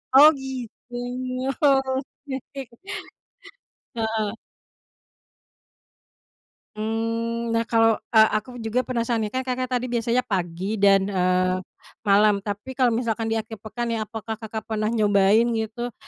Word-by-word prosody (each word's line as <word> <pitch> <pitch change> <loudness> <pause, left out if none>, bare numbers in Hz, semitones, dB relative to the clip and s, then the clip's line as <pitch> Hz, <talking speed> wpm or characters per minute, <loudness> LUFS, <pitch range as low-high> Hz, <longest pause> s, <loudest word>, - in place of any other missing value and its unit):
Oh, 295 +3 +10
gitu. 255 -2 -8 0.7
Oke, 270 -1 -1 1.3
heeh 220 -2 -1 2.5
Mmm, 230 +1 -2
nah, 230 - +3
kalau 225 -1 +3
a 220 - +5 0.2
aku 245 +2 -11
juga 240 +3 +1
penasaran 235 -2 -1
nih, 210 - -1
kan 260 0 -1
Kakak 255 0 -2
tadi 250 - -3
biasanya 235 +2 +1
pagi 185 0 -2
dan, 195 -1 +5
eee, 185 -1 +1 0.4
malam, 205 -1 +4
tapi 210 +6 -5
kalau 255 -1 +3
misalkan 225 -1 -1
di 225 - +1
akhir 220 -1 -6
pekan 235 +1 -3
ya, 220 - -1
apakah 225 0 -5
Kakak 220 -1 -5
pernah 215 -1 -1
nyobain 210 0 +4
gitu, 225 +1 -3
225 Hz, 120 wpm, -24 LUFS, 210-245 Hz, 2.5 s, Oh